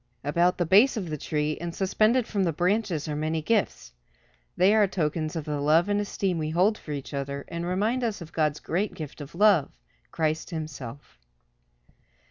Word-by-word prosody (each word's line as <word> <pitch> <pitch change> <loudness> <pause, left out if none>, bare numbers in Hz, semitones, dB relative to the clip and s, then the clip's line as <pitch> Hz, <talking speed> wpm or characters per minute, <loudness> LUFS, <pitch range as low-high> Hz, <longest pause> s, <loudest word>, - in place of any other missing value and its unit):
About 170 +5 +2
the 175 - +1
base 210 - +5
of 180 -7 -4
the - - -1
tree, 150 +1 -2
and 170 0 -5
suspended 215 +5 +2
from 200 -3 -1
the 170 - +1
branches 180 -1 0
are 150 - -3
many 155 +2 -1
gifts. 190 - -1 0.6
They 190 +3 +5
are 215 -2 +4
tokens 155 -3 -2
of 160 -3 -3
the 150 -2 -2
love 160 +6 +3
and 205 0 +1
esteem 195 -3 -2
we 155 -1 -2
hold 185 +7 +3
for 155 - -10
each 145 0 -5
other, 140 0 -4
and 170 0 -4
remind 215 +8 0
us 220 -3 -1
of 170 -3 -10
God's 150 -2 0
great 195 +5 -2
gift 155 -1 -8
of 145 +3 -9
love, 195 -7 +4 0.4
Christ 155 0 -1
himself. 145 - -7
170 Hz, 185 wpm, -26 LUFS, 150-200 Hz, 0.6 s, base